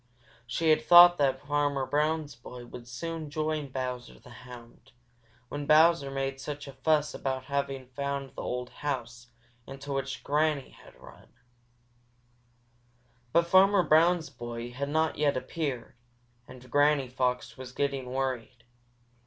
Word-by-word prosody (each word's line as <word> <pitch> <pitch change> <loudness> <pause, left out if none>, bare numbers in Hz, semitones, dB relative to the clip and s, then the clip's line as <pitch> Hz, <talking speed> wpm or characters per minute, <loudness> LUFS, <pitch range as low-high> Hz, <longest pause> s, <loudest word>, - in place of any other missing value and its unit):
She 160 +6 +1
had 155 0 +4
thought 175 +1 +8
that 135 -1 +1
Farmer 145 -2 0
Brown's 150 +1 0
boy 120 +1 -11
would 120 0 -11
soon 155 +5 -5
join 155 0 -2
Bowser 125 - -5
the - - -16
Hound, 120 -2 -14 0.5
when 145 +2 -5
Bowser 155 -1 +5
made 135 0 -3
such 145 0 -6
a 140 - -9
fuss 150 +2 +1
about 130 -1 -3
having 140 -1 -3
found 140 +1 -4
the - - -7
old 125 0 -4
house 120 -4 -5 0.4
into 135 +1 -7
which 135 0 -4
Granny 150 -1 0
Fox - - -18
had - - -17
run. - - -15 2.0
But 170 +4 +3
Farmer 190 +2 +5
Brown's 160 0 +3
boy 120 -1 -7
had 140 +3 -4
not 160 +1 0
yet 145 -3 +2
appeared, 135 -3 -4 0.5
and 125 -1 -14
Granny 145 -2 +3
Fox 125 0 -2
was 130 -1 -9
getting 135 -2 -2
worried. 130 -2 -3
140 Hz, 140 wpm, -29 LUFS, 130-155 Hz, 2.0 s, thought